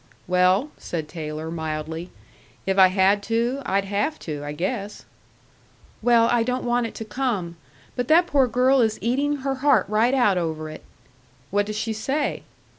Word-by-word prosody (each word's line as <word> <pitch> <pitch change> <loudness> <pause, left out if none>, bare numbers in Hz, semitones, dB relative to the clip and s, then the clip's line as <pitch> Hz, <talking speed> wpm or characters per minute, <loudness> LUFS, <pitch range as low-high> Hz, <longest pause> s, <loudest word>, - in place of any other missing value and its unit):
"Well," 185 +9 +3
said 160 -3 -4
Taylor, 155 0 -6
mildly, 160 +1 -4 0.6
"if 190 +1 +1
I 190 - +9
had 190 +2 +3
to, 235 +4 0
I'd 195 +1 +1
have 205 +10 -1
to, 150 -3 -5
I 145 - -5
guess." 195 +6 -4 1.0
"Well, 230 0 +4
I 240 -1 +3
don't 250 +2 -1
want 240 -1 +1
it - - -11
to 225 - -6
come. 210 -8 -2 0.4
But 245 -1 -2
that 340 +3 +5
poor 275 -6 +3
girl 255 +3 +3
is 220 -2 +1
eating 280 +5 0
her 275 - +1
heart 290 0 +4
right 220 +5 +2
out 210 -8 +3
over 160 -2 -3
it." 155 - -10 0.7
"What 205 +1 +1
does 215 0 -4
she 220 +1 -2
say?" 270 +7 -2
215 Hz, 170 wpm, -23 LUFS, 180-245 Hz, 1.0 s, I